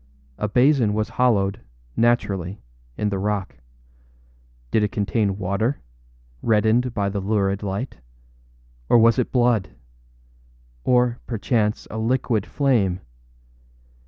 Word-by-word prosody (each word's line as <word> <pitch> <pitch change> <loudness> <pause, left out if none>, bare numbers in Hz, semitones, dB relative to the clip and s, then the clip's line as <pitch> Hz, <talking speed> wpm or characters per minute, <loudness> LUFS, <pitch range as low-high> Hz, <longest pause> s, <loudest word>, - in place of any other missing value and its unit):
A 105 - 0
basin 125 -3 +3
was 110 0 -1
hollowed, 105 -5 +1 0.3
naturally, 100 -6 0 0.4
in 105 - 0
the 100 -1 -2
rock. 100 -1 -2 1.1
Did 110 - +3
it 105 0 0
contain 105 -3 0
water, 100 +7 -1 0.6
reddened 115 +2 +2
by 100 -2 0
the 100 0 -3
lurid 100 -1 0
light? 100 +6 -4 0.9
or - - +6
was 115 +1 +5
it 125 - -1
blood? 120 - +1 1.1
or, 125 -1 +2
perchance, 110 -1 -1
a 110 - -4
liquid 115 -2 0
flame? 105 -10 +1
110 Hz, 110 wpm, -23 LUFS, 100-120 Hz, 1.1 s, or